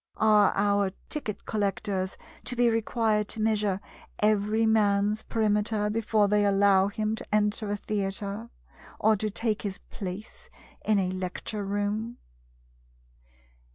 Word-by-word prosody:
Are 210 -2 +5
our 200 -1 +2 0.2
ticket 250 -9 -4
collectors 195 -2 -2 0.3
to 250 - 0
be 240 -1 +3
required 220 -2 +1
to 220 - -1
measure 210 -3 +1 0.4
every 215 +1 +2
man's 210 -1 +2
perimeter 210 -1 0
before 215 -1 +2
they 210 0 +3
allow 200 -1 +4
him 215 +1 -2
to - - -6
enter 210 0 +1
a 205 - -1
theatre, 200 +2 -3 0.5
or 220 0 +3
to 215 +2 -1
take 215 +1 -1
his 195 -2 -4
place 195 +3 -7 0.3
in 215 -1 +3
a 185 -2 +1
lecture 185 +3 -4
room? 205 +4 -2
210 Hz, 125 wpm, -27 LUFS, 200-220 Hz, 0.5 s, Are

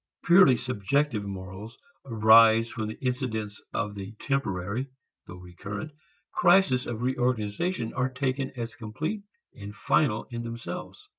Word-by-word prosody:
Purely 175 -8 +6
subjective 125 +1 0
morals 100 +3 -8 0.3
arise 115 0 +6
when 110 -2 -2
the 110 - -6
incidents 110 -5 -2
of 105 0 -2
the 100 +1 -7
temporary 110 -2 -2 0.4
(though 90 - -9
recurrent) 95 - -7 0.4
crisis 140 -11 +4
of 120 0 -4
reorganization 125 - -1
are 125 +1 0
taken 130 +1 -2
as 115 -1 -4
complete 150 - -4 0.3
and 105 -2 -9
final 135 0 +1
in 120 0 -4
themselves. 115 0 -7
115 Hz, 125 wpm, -27 LUFS, 105-130 Hz, 0.4 s, Purely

